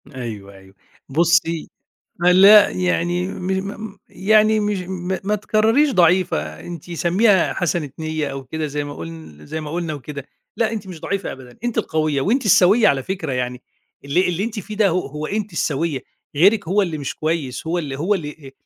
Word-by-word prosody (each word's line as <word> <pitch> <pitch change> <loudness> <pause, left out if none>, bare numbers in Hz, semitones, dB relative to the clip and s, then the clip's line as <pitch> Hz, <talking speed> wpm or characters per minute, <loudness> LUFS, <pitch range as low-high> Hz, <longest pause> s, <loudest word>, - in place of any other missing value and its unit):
أيوه، 105 -6 -7
أيوه. 95 0 -17 0.3
بُصي، 170 +2 +2 0.5
م 175 - +1
لأ، 200 +3 +8
يعني 180 0 0
م 180 - -6 0.4
م 200 -1 -14
يعني 215 +2 +3
مش 205 -1 -1
م 185 0 -4
ما 210 - +1
تكرريش 220 +7 +2
ضعيفة، 170 - +2
أنتِ 175 -1 -9
سميها 185 +3 +3
حسنة 175 -5 -1
نية 155 -1 -2
أو 135 -1 -6
كده 155 +4 -4
زي 145 0 -3
ما 145 0 -7
قُلن 80 - -10
زي 160 - -4
ما 150 - -7
قُلنا 165 -1 -3
وكده. 140 -1 -8 0.3
لأ، 225 -1 +1
أنتِ 210 -3 -5
مش 175 -4 -9
ضعيفة 200 +3 -3
أبدًا، 130 -2 -13
أنتِ 240 -1 -1
القويّة، 155 -3 0
وأنتِ 240 - +1
السويّة 205 +3 +5
على 135 -1 +1
فكرة 165 -3 -4
يعني. 125 0 -3 0.4
اللي 145 +7 +1
اللي 180 +3 -1
أنتِ 225 -1 -4
فيه 210 +3 -8
ده 210 -1 +4
ه - - 0 0.2
هو 150 +2 -5
أنتِ 210 +1 -3
السويّة، 155 -2 -1 0.4
غيرِك 195 +2 +4
هو 200 +3 +3
اللي 165 -5 -3
مش 140 - -4
كويس، 155 -4 -3
هو 170 +2 0
اللي، 140 -5 -4
هو 185 +7 +1
اللي، 150 -5 -7
170 Hz, 185 wpm, -20 LUFS, 145-195 Hz, 0.5 s, لأ